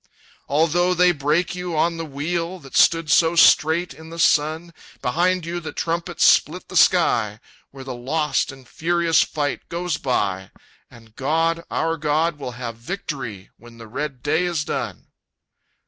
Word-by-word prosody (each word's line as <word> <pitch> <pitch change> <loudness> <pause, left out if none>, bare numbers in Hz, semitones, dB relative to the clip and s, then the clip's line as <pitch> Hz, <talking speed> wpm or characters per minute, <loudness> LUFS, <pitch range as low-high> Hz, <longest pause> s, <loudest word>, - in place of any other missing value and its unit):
"Although 170 +5 +2
they 180 0 +5
break 155 +3 0
you 180 -2 -4
on 165 +2 +1
the 165 - -4
wheel, 165 +5 -3
That 140 -6 -13
stood 165 -3 +4
so 165 +2 +4
straight 165 +1 +4
in 160 0 -13
the 165 - -9
sun, 160 +2 +1 0.3
Behind 175 +6 +1
you 170 +1 -3
the 165 - -7
trumpets 170 +1 -1
split - - +3
the - - -9
sky, - - +3 0.3
Where 135 -1 -11
the 130 -1 -6
lost 140 +4 -1
and 135 -2 -15
furious 170 0 +1
fight 145 -3 -3
goes 175 -1 -2
by 95 -7 -1 0.4
And 115 -2 -18
God, 165 +4 0
our 165 +1 -1
God, 150 +1 0
will 130 -3 -6
have 120 -2 -6
victory 120 - -6
When 120 0 -16
the 115 - -11
red 130 +2 -5
day 160 +4 +1
is 170 -4 -1
done!" - - -4
160 Hz, 160 wpm, -22 LUFS, 135-170 Hz, 0.4 s, they